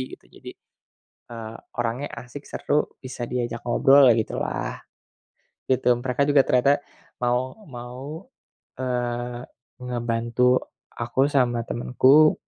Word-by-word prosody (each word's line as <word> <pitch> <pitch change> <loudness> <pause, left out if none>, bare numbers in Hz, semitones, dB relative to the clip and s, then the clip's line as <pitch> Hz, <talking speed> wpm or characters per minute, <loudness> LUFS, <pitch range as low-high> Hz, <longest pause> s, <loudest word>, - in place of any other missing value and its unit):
gitu. - - -31
Jadi, - - -10 0.8
eee, 115 -1 -7 0.2
orangnya 120 +4 -2 0.2
asik, 140 +4 -10
seru, 150 - 0 0.2
bisa 125 -1 -5
diajak 120 -1 -2
ngobrol 135 +2 +6
ya - - +2
gitulah. 110 - -3 0.9
Di 130 - +3
tim 120 -1 +3
mereka 130 +1 +1
juga 145 -2 +6
ternyata 135 +3 +4 0.4
mau 125 - 0
mau, 135 - -8 0.5
eee, 120 -1 -2 0.4
ngebantu 120 0 +1 0.4
aku 120 +4 +1
sama 125 -5 +2
temenku, 135 +5 +5
125 Hz, 110 wpm, -24 LUFS, 120-135 Hz, 0.9 s, ngobrol